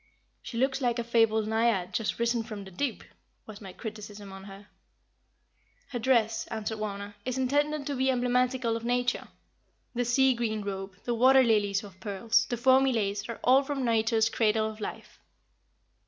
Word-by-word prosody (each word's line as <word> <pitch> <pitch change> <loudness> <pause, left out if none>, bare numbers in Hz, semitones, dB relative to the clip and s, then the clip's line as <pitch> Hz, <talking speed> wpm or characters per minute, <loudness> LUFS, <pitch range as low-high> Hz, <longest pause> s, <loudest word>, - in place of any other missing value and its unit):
"She 230 - -7
looks 265 +3 +1
like 240 -2 +1
a 235 - -1
fabled 225 -2 +2
Naiad 220 -5 +1
just 215 0 -1
risen 235 0 +1
from 215 -3 -7
the 190 - -11
deep," 255 +6 -3 0.4
was 215 -1 -11
my 195 -2 -8
criticism 210 -1 -8
on 195 0 -10
her. 195 0 -11 1.2
"Her 245 - -4
dress," 225 -2 +1
answered 220 -1 -4
Wauna, 205 -1 -5
"is 255 0 -3
intended 290 +3 0
to 285 - -2
be 265 +1 +1
emblematical 250 -1 +1
of 230 - -5
Nature. 245 +1 0 0.7
The 245 0 0
sea 260 +2 +3
green 220 -3 -2
robe, 195 -1 -5
the 240 - -1
water 260 +3 +6
lilies 205 -3 +2
of 195 -2 -13
pearls, 205 +3 +1
the 240 - -1
foamy 260 +2 +4
lace 205 -2 -2
are 230 - -5
all 265 +2 +6
from 275 -2 -3
Nature's 225 -1 +2
Cradle 220 -1 +1
of 220 0 -8
Life." - - -7
230 Hz, 170 wpm, -28 LUFS, 210-250 Hz, 1.2 s, water